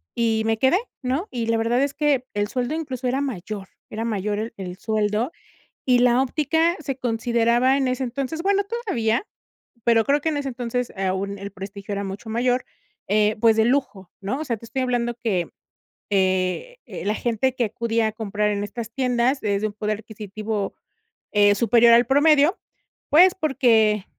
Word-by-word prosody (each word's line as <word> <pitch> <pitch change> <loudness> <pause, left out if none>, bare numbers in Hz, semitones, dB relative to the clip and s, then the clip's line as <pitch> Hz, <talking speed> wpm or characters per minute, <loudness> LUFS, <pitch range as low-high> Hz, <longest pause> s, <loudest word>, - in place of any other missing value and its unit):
Y 225 -2 +1
me 225 0 +1
quedé, 265 +9 +3 0.2
¿no? 270 +10 -1
Y 235 -2 -3
la 230 0 +2
verdad 235 +4 +1
es 280 0 -1
que 290 -4 +1
el 205 0 0
sueldo 250 +5 -2
incluso 275 -6 -4
era 255 +2 +1
mayor, 205 -6 -5 0.2
era 225 +1 -4
mayor 210 -1 -2
el 225 +1 -4
el 185 -1 -6
sueldo 215 - -1 0.5
y 250 -2 +4
la 245 +1 +4
óptica 320 +5 +1
se 275 -3 -4
consideraba 235 +2 +2
en 270 -2 +1
ese, 255 +1 -1
entonces, 275 +6 -3
bueno, 400 +1 +2
todavía, 395 - -1 0.6
pero 230 -1 +4
creo 285 +4 +2
que 320 +2 -1
en 295 - -1
ese, 280 -1 -2
entonces, 245 0 -3
aún 195 +1 -2
el 200 +1 -7
prestigio 200 +1 -7
era 200 - -2
mucho 200 +3 -7
mayor, 245 +2 0 0.4
eh, 210 +1 +2
pues, 225 0 +5
de 220 0 +3
lujo, 240 -8 -1
¿no? 205 +8 -3
O 310 - -2
sea, 235 -4 -2
te 230 - -13
estoy 260 +3 -3
hablando 245 -1 0
que, 210 -8 -1 0.6
eh 190 - 0
eh, - - -7
la 210 - +1
gente 245 +2 0
que 240 - +1
acudía 225 +1 0
a - - -2
comprar 210 -1 -1
en 205 0 -2
estas 220 +2 -6
tiendas 250 +1 0
es 200 -1 0
de - - +2
un 205 - -8
poder 210 0 -2
adquisitivo, 215 -1 -5 0.6
eh, 205 0 +5
superior 235 +2 +5
al 240 +1 +6
promedio, 295 +4 +4 0.5
pues, 360 +5 +6
porque 230 - +2
235 Hz, 185 wpm, -23 LUFS, 210-265 Hz, 0.6 s, al